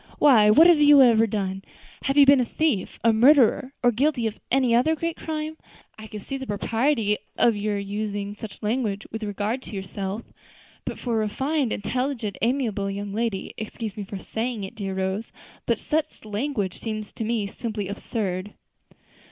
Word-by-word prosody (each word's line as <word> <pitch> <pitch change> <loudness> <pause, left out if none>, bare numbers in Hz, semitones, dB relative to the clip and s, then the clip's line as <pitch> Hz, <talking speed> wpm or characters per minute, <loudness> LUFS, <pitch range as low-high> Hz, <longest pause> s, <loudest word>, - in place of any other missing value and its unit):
Why, 230 -8 +6
what 305 +10 +7
have 345 -3 +6
you 290 -2 +8
ever 225 -2 +5
done? 195 -2 -3 0.4
Had 275 +1 0
you 285 - +8
been 275 0 +7
a - - +3
thief, 255 -4 -1
a 230 -1 +5
murderer, 260 +2 +5
or 245 - +5
guilty 255 +1 +1
of 220 -1 -3
any 255 -2 +3
other 255 +7 +3
great 335 +1 -3
crime, 315 0 -5 0.4
I 220 0 -10
could 210 -2 -8
see 275 - -4
the 265 -1 -7
propriety 225 +1 0 0.2
of 235 -2 +4
your 205 0 -1
using 205 0 -3
such 210 +1 -10
language 215 -2 -1
with 225 - -5
regard 210 +4 -2
to 220 - -9
yourself; 195 +2 -5 0.6
but - - -4
for 240 - -3
a - - +2
refined, 270 +2 -1
intelligent, 250 -1 -2
amiable 225 -5 0
young 200 0 -5
lady, 225 -3 -2
excuse 220 -1 -5
me 210 - -5
for 195 0 -7
saying 225 +2 -4
it, 190 - -7
dear 195 -3 -4
Rose, 190 +3 -2 0.4
but 235 - +2
such 310 -3 -3
language 210 -2 -3
seems 215 -2 -5
to - - -5
me 220 -2 -1
simply 210 0 -4
absurd." 200 -1 -4
220 Hz, 175 wpm, -24 LUFS, 205-260 Hz, 0.6 s, you